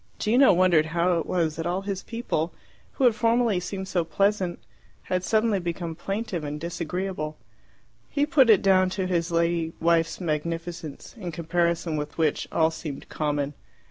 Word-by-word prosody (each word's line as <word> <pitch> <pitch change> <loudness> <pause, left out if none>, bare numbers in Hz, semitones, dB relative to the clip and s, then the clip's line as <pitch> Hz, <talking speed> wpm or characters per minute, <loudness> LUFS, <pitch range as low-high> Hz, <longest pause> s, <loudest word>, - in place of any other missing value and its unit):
Gino 245 +5 +5
wondered 175 -3 +4
how 175 0 +3
it - - -4
was 165 -4 0
that 165 +1 -2
all 180 +2 -1
his 195 -1 -3
people, 230 -8 -3 0.4
who 275 - -2
had 245 -3 +6
formerly 230 -2 +2
seemed 190 +1 -5
so 185 -2 0
pleasant, 190 +1 0 0.5
had 185 0 -1
suddenly 215 0 +2
become 170 -1 -4
plaintive 195 0 -3
and 150 0 -4
disagreeable. 170 -1 -4 0.7
He 285 0 +1
put 290 -6 +4
it 210 -4 +6
down 185 -1 +4
to 190 - 0
his 175 -2 0
lady 170 -1 0
wife's 165 0 +2
magnificence, 165 -1 -4
in 180 -4 -4
comparison 170 -1 0
with 150 0 -5
which 160 -3 +1
all 160 -1 +3
seemed 150 -4 -7
common. 145 -2 -1
175 Hz, 160 wpm, -26 LUFS, 165-195 Hz, 0.7 s, had